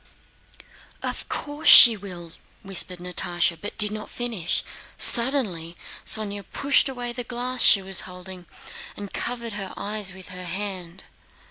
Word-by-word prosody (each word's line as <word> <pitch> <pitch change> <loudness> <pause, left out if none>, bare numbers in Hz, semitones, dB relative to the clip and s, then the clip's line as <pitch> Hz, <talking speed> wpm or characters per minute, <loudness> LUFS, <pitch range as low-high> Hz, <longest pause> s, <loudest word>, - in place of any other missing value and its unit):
"Of - - -5
course 290 +1 -5
she 235 -2 +10
will!" 180 -5 -10 0.3
whispered 190 -2 -1
Natásha, 175 -1 -2
but 205 - -7
did 210 0 +5
not 215 0 -7
finish... 230 -9 -3 0.3
suddenly 225 - +2 0.3
Sónya 205 -2 +1
pushed 280 0 +3
away 245 -2 -6
the 245 0 -6
glass 250 +1 -4
she 200 -2 +6
was 190 0 -1
holding 180 -1 -11 0.5
and 200 -1 -9
covered 235 -2 -4
her 195 -2 -6
eyes 205 -1 -3
with 190 -1 -13
her 180 0 -9
hand. 185 -1 -6
200 Hz, 135 wpm, -23 LUFS, 180-235 Hz, 0.5 s, she